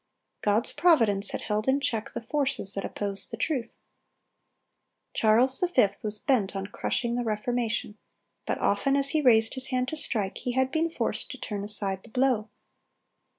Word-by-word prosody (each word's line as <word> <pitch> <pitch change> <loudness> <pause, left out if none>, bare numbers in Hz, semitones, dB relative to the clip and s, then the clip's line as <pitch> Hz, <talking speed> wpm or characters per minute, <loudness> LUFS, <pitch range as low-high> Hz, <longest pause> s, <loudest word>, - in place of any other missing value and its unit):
God's 210 +4 +1
providence 225 - +3
had - - -4
held 215 +2 -2
in 265 +1 +3
check 225 -6 -2
the 235 - -4
forces 255 -6 +1
that 195 - -3
opposed 200 -1 -2
the 230 - -6
truth. 250 -1 -2 1.4
Charles 240 +4 +4 0.2
V. 250 - +6 0.2
was 210 0 +1
bent 210 -5 0
on 195 0 -3
crushing 235 +4 -2
the 245 0 -1
Reformation, 225 -1 -2 0.5
but - - 0
often 270 +7 +1
as 280 0 +2
he 310 - +1
raised 225 -4 +4
his 260 -1 -3
hand 255 -1 -1
to 315 - -4
strike, 215 -10 0
he 245 - -3
had 260 +1 +1
been 325 +2 +1
forced - - -2
to - - -7
turn 205 -2 -5
aside 200 -2 -3
the 230 - -16
blow. 245 -3 +1
230 Hz, 170 wpm, -27 LUFS, 210-260 Hz, 1.4 s, V